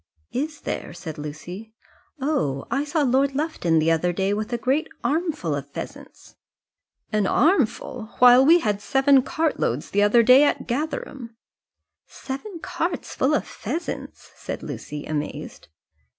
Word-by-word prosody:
"Is 295 +2 -3
there?" - - -4
said 165 -4 -7
Lucy. 175 +9 -8 0.4
"Oh! 260 - -1
I 275 +1 +1
saw 300 +1 0
Lord 270 +1 +2
Lufton 285 - 0
the 160 +1 +3
other 165 +2 +2
day 195 +3 0
with 215 +3 -3
a 240 - 0
great 265 +6 0 0.2
armful 320 0 -1
of - - -4
pheasants." - - -10 0.8
"An 210 -2 +2
armful! 265 - +1
Why 245 0 +8
we 325 +6 +6
had 205 -5 -1
seven 270 +3 +4
cartloads 255 - -1
the 205 - +2
other 210 +3 +5
day 255 +5 +7
at 290 - +1
Gatherum." 255 -3 -4 0.7
"Seven 310 +9 -7
carts 350 -3 -3
full 280 +4 +2
of - - -1
pheasants!" 310 - -6
said - - -6
Lucy, 150 0 -6
amazed. 150 -1 -5
255 Hz, 140 wpm, -24 LUFS, 200-295 Hz, 0.8 s, Why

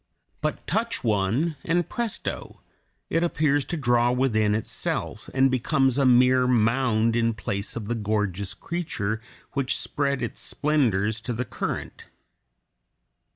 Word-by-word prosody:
But - - -2
touch 230 +1 -1
one, 115 - +1
and 175 +1 +1
presto! 235 -2 -4 0.5
it 165 - +2
appears 145 -4 +2
to 175 - -3
draw 120 -3 +3
within 110 -5 +2
itself, 110 - -3
and 135 0 +3
becomes 135 +1 +2
a 135 - +4
mere 125 0 +5
mound 115 -1 +2
in 115 -1 +1
place 100 +1 -4
of 110 -3 -5
the 120 - 0
gorgeous 105 -3 -1
creature 110 -11 -3 0.3
which 135 -2 -1
spread 140 -3 -1
its 115 - -4
splendors 110 -8 +1
to 120 +1 -3
the 125 +3 -2
current. - - -5
125 Hz, 130 wpm, -25 LUFS, 110-140 Hz, 0.5 s, mere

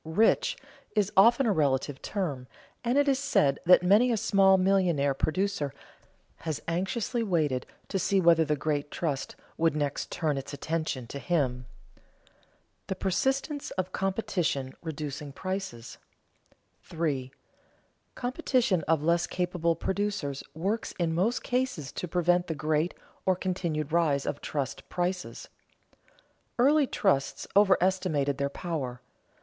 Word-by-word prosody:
"Rich" 215 - +2 0.4
is 210 -2 +2
often 235 +7 +6
a 225 - +3
relative 140 -4 0
term, 145 -11 -3 0.4
and 245 +3 +1
it 285 0 +4
is 270 -1 +3
said 140 - +2
that 180 0 +7
many 210 +7 +5
a 230 - +1
small 195 -3 +4
millionaire 180 -7 +2
producer 155 0 -1 0.6
has 160 -3 -4
anxiously 200 +8 -1
waited 155 - 0 0.2
to 195 - -1
see 195 +1 +2
whether 165 -2 +5
the 150 -1 0
great 145 0 -2
trust 150 -5 -3 0.2
would 165 -2 +2
next 145 -2 -2
turn 150 -4 -1
its 135 +2 -8
attention 155 -5 -3
to 140 +4 -7
him. 130 -7 -1
[Sidenote: - - -30
The 190 - -2
persistence 270 - -1
of 185 0 -2
competition 180 -9 -1
reducing 150 -3 -5
prices] 185 -11 -5 0.8
3. 145 -6 -2 0.8
Competition 250 - +1
of 160 -2 +2
less 170 +1 +2
capable 175 -2 0
producers 190 -6 -2
works 195 +8 -2
in 170 -2 0
most 200 +9 +1
cases 245 - -1
to 180 - -5
prevent 175 +1 +2
the 160 - -2
great 155 +3 0 0.3
or 185 - +4
continued 170 -5 -2
rise 155 -5 +2
of 145 - -3
trust 140 -4 -4
prices. 180 +1 -3 1.1
Early 280 +3 +4
trusts 135 - 0
overestimated 185 -8 +3
their 140 0 0
power. 140 -6 -4
170 Hz, 130 wpm, -28 LUFS, 145-195 Hz, 1.1 s, that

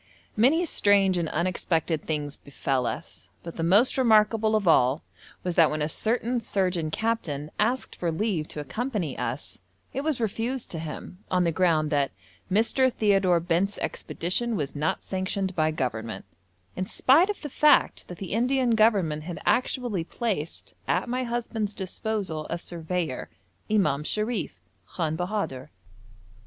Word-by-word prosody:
Many 280 +11 +4
strange 200 - +3
and 165 -2 -1
unexpected 170 -2 -1
things 150 -2 -2
befell 135 -3 -2
us, - - -6
but 170 - -7
the - - -4
most 205 +11 +4
remarkable 220 -2 +4
of 205 -4 0
all 130 -2 +4 0.4
was 180 - -1
that 165 -2 +5
when 155 0 -1
a - - +1
certain 235 +7 0
surgeon 180 -6 0
captain 155 -8 -2
asked 240 +5 0
for 170 -2 -1
leave 175 -3 -1
to - - -7
accompany 200 - -3
us, 125 +5 -4 0.3
it 270 - -1
was 305 -3 0
refused 230 +3 -1
to 165 - -4
him 160 +4 -7
on 180 -1 +2
the 170 - +2
ground 160 -3 +2
that 145 -2 +2 0.4
'Mr. 230 +6 +3
Theodore 195 -6 +3
Bent's 175 +4 0
expedition 225 +7 -2
was 150 -6 -3
not 150 +2 -1
sanctioned 190 0 -2
by 155 -2 +2
Government,' 115 -7 -3 0.5
in 185 0 -2
spite 315 - +4
of 415 - -3
the - - -3
fact 300 +2 +3
that 180 - -8
the 190 0 -5
Indian 250 +2 +2
Government 200 -9 +3
had 175 0 -5
actually 240 -6 +1
placed 185 -4 -4
at - - +1
my 255 +1 -1
husband's 225 -3 -2
disposal 190 -4 -3
a 170 - -1
surveyor, 170 -4 -3 0.4
Imam 150 -10 +2
Sharif, 210 - -2 0.3
Khan 160 -3 -2
Bahadur. 180 -7 -3
185 Hz, 150 wpm, -26 LUFS, 160-225 Hz, 0.5 s, that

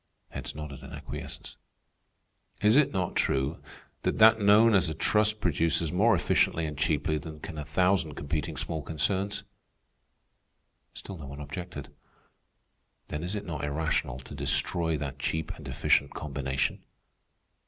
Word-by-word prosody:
Heads - - -6
nodded 75 -2 -7
in - - -10
acquiescence. - - -7 1.0
"Is 105 +2 +4
it 150 -1 +5
not 95 -3 -2
true 65 +4 0 0.4
that - - 0
that 110 0 +7
known 105 +3 +6
as 95 -4 +4
a 80 - -4
trust 105 +4 +2
produces 85 -2 +1
more 105 +5 +4
efficiently 85 -1 +2
and 75 -1 -4
cheaply 75 0 +1
than 80 +1 -9
can 80 0 -7
a 75 - -5
thousand 85 0 +2
competing 75 +1 -3
small 80 -1 -2
concerns?" 95 +7 -1 1.5
Still 95 -4 -8
no 70 - -8
one 70 +1 -8
objected. 75 0 -7 1.2
"Then 75 - -3
is 90 +4 -3
it 105 -1 -4
not 75 -5 -4
irrational 75 -4 -1
to 65 - -11
destroy 75 +4 +1
that 70 -1 -5
cheap 80 +3 -2
and - - -10
efficient 70 - +2
combination?" 70 -3 -2
80 Hz, 145 wpm, -29 LUFS, 75-95 Hz, 1.5 s, that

